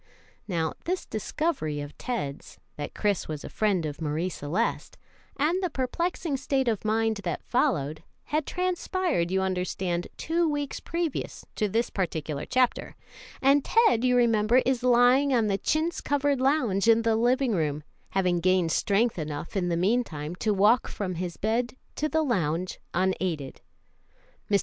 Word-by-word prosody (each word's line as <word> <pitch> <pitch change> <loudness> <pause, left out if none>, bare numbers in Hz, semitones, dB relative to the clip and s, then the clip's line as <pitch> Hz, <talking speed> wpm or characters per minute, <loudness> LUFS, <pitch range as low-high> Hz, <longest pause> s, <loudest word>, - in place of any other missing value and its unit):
Now, 165 -5 -1
this 365 +2 -2
discovery 215 - -2
of 145 0 -7
Ted's, 185 - -5 0.2
that 145 -1 -6
Chris 205 -3 0
was 155 -2 -5
a - - -7
friend 200 -6 +1
of 150 +1 -5
Marie 160 +4 -1
Celeste, 175 +7 -2 0.4
and 330 +6 +1
the 365 - 0
perplexing 315 +3 -2
state 265 -1 0
of 220 -4 0
mind 220 0 +1
that 180 -5 -4
followed, 160 - 0 0.2
had 305 0 -1
transpired, 360 - 0
you 190 +1 +1
understand, 180 -1 -2
two 335 0 +1
weeks 290 -2 -2
previous 335 -4 -3
to 210 -2 0
this 230 +4 0
particular 155 -6 -3
chapter, 255 -1 +1 0.5
and 275 +1 +5
Ted, 450 - +3
you 250 -1 +3
remember, 235 +1 +4
is 260 -2 +1
lying 250 +3 +4
on 230 -2 +3
the 200 -1 0
chintz 320 - 0
covered 285 -1 +1
lounge 245 -8 +2
in 230 0 +5
the 225 -1 +2
living 245 +2 +2
room, 150 -4 -1 0.3
having 180 -2 +1
gained 180 -1 +2
strength 210 +3 +1
enough 150 +2 -5
in 180 -2 0
the 170 - 0
mean 220 +8 +2
time 150 -5 -6
to 215 - 0
walk 210 +4 +4
from 190 -3 -4
his 175 0 -4
bed 235 +4 -1 0.2
to 305 - -1
the 315 +1 +1
lounge 180 - -1 0.2
unaided. 180 -6 -1 0.9
Mr. 200 -1 +4
220 Hz, 160 wpm, -27 LUFS, 175-265 Hz, 0.9 s, and